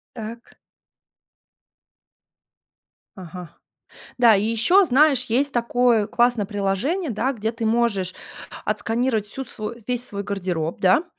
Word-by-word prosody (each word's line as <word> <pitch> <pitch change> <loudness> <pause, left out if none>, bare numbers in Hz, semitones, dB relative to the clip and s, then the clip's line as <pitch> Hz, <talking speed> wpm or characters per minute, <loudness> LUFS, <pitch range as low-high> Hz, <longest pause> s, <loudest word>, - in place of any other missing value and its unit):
Так. 230 +1 -9 2.6
Ага. 180 -2 -9 0.7
Да, 235 -3 +6
и 200 - 0
ещё, 235 - +4
знаешь, 275 -3 +4
есть 270 +5 0
такое 240 -2 +2
классное 240 -1 +1
приложение, 215 - -1
да, 240 +5 -1
где 220 -2 -3
ты 230 -1 -3
можешь 220 -5 0 0.5
отсканировать 225 -2 -1
всю 270 +6 -5
свою 230 -2 -6
весь 250 0 -2
свой 200 -1 -5
гардероб, 180 -5 -3
да, 190 - +4
230 Hz, 115 wpm, -22 LUFS, 200-250 Hz, 2.6 s, Да